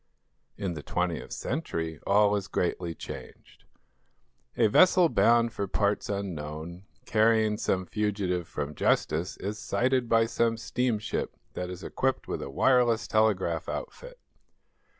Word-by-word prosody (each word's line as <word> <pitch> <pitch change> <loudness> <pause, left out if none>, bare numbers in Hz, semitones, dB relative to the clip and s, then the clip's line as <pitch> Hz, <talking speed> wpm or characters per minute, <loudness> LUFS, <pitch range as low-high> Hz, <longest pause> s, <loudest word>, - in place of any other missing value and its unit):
In 95 -3 -2
the 75 - -6
twentieth 90 +1 -2
century 80 - -3
all 105 +1 +4
is 100 -2 -3
greatly 85 -2 -2
changed. - - -10 0.9
A - - +4
vessel 180 - +5
bound 115 -3 +3
for 100 -2 -3
parts 100 +1 0
unknown, 85 -2 -5 0.2
carrying 110 -1 +3
some 95 -1 0
fugitive 95 -4 -1
from 75 0 -4
justice, 80 +4 0
is 105 +2 -5
sighted 125 -1 0
by 115 0 +4
some 115 0 0
steamship 115 -1 -2 0.2
that 90 0 -4
is 90 0 -8
equipped 135 0 -1
with - - -3
a - - -5
wireless 120 - +3
telegraph 95 -6 +1
outfit. - - -7
105 Hz, 130 wpm, -28 LUFS, 90-115 Hz, 0.9 s, vessel